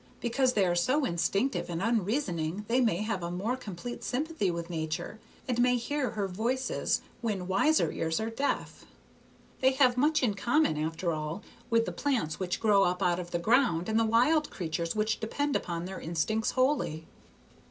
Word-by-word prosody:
Because 255 +2 +1
they 200 -4 +3
are 175 - +2
so 255 +12 +2
instinctive 195 +10 0
and 170 -1 -3
unreasoning 200 - -1
they 250 +3 +2
may 210 -5 +1
have 215 -4 -2
a 170 - -3
more 195 +8 -1
complete 240 -1 -7
sympathy 285 - -1
with 170 -1 -3
Nature, 170 +4 -4 0.3
and 245 -2 +1
may 250 0 +4
hear 265 +2 -1
her 205 -2 -2
voices 235 +8 -1 0.2
when 200 -6 -2
wiser 250 +12 +3
ears 160 0 -1
are 220 +1 -2
deaf. 275 +5 -2 0.8
They 260 0 +4
have 255 -2 +4
much 300 +2 +3
in 225 -5 +2
common, 240 - +2
after 160 +3 -2
all, 155 +5 -4 0.3
with 230 -1 +3
the - - -3
plants 240 - -1
which 185 -2 -2
grow 205 -3 +4
up 180 0 0
out 175 0 +2
of 175 -1 -6
the 175 - -1
ground 215 -3 +2
and 220 +1 +2
the - - +3
wild 250 +8 +3
creatures 170 -1 -3
which 215 +1 0
depend 285 +6 -1
upon 170 0 -2
their 190 +1 -6
instincts 195 +7 0
wholly." 255 - 0
215 Hz, 180 wpm, -29 LUFS, 175-250 Hz, 0.8 s, may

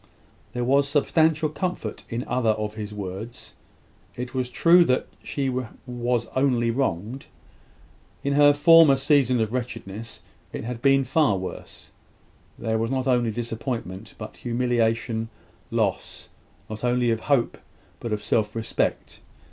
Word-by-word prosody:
There 125 0 -2
was 140 +3 +3
substantial 155 +2 +2
comfort 155 - -4
in 120 +2 -3
other 125 -3 +1
of 105 0 -4
his 105 -1 -6
words. 105 +3 -7 0.6
It 125 0 -6
was 130 -1 -1
true 170 +7 +5
that 125 -2 +1 0.2
she 140 -2 -3 0.4
was 120 -1 -1
only 125 -3 +2
wronged. 115 0 -2 1.0
In 140 - 0
her 145 0 +7
former 155 0 +7
season 135 -3 +3
of 110 0 -1
wretchedness, 115 -3 -6 0.3
it - - -5
had 115 0 -5
been 135 0 +4
far 130 -5 +2
worse: 95 0 -8 0.7
there 110 -1 -1
was 115 +1 -1
not 130 -1 -1
only 125 -3 +2
disappointment, 115 -3 -5
but 105 -1 -9
humiliation; 115 -2 0 0.4
loss, - - -2 0.4
not 110 +1 -8
only 125 -1 +2
of 115 - 0
hope, 135 0 0 0.4
but 115 - -5
of 105 -1 -2
self 105 -1 0
respect. 115 0 -2
120 Hz, 135 wpm, -24 LUFS, 115-135 Hz, 1.0 s, her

